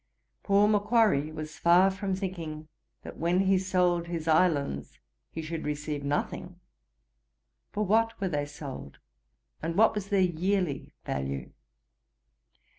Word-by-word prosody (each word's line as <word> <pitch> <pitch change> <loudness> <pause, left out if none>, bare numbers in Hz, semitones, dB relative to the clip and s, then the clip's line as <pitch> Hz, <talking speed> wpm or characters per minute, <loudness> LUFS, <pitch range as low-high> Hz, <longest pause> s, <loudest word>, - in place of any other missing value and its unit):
Poor 200 +1 +4
Macquarry 210 -8 +3
was 155 0 -7
far 180 +3 +5
from 190 0 -2
thinking 165 -5 -5 0.4
that - - -9
when 175 +3 +2
he 190 -1 +3
sold 180 -2 +1
his 165 -2 -4
islands 155 - +1 0.3
he 160 - -6
should 160 0 -4
receive 150 0 -3
nothing. 145 +1 -3 1.1
For 210 +1 -1
what 225 +3 +2
were 195 - 0
they 145 -3 -1
sold? 135 - -8 0.6
And 165 +1 -3
what 220 +1 +5
was 205 -2 -4
their 200 - +2
yearly 180 -3 0
value? 65 0 -3
170 Hz, 125 wpm, -28 LUFS, 150-195 Hz, 1.1 s, far